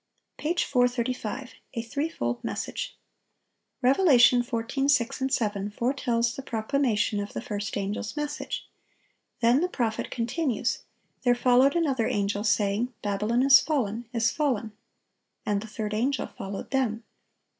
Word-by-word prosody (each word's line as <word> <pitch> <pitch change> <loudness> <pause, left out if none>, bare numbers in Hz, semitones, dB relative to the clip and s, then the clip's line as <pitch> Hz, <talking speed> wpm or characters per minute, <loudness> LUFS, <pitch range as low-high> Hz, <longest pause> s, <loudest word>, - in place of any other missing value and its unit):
Page 340 +4 0
435. 245 -1 -1 0.2
A 230 - -1
THREEFOLD 230 - -3
MESSAGE.—Rev. 270 - -4
14:6, 255 -2 +3
7, 205 -4 0
foretells 235 0 0
the - - -5
proclamation 225 -3 0
of 200 0 -5
the - - -3
first 205 -4 -4
angel's 205 +6 -3
message. 295 0 -4 0.7
Then 240 +5 +4
the 360 - +1
prophet 230 -8 -2
continues: 245 0 -1 0.4
"There 245 -2 +3
followed 250 +3 +4
another 275 -9 +1
angel, 205 0 0
saying, 215 +3 +1
Babylon 210 +4 +1
is 275 0 +8
fallen, 240 -7 -1
is 230 -2 +2
fallen,... 245 -8 -1 0.7
and 205 -1 0
the 220 - -8
third 215 -1 -4
angel 260 +6 0
followed 195 0 -7
them." 240 -4 0
240 Hz, 120 wpm, -27 LUFS, 215-270 Hz, 0.7 s, is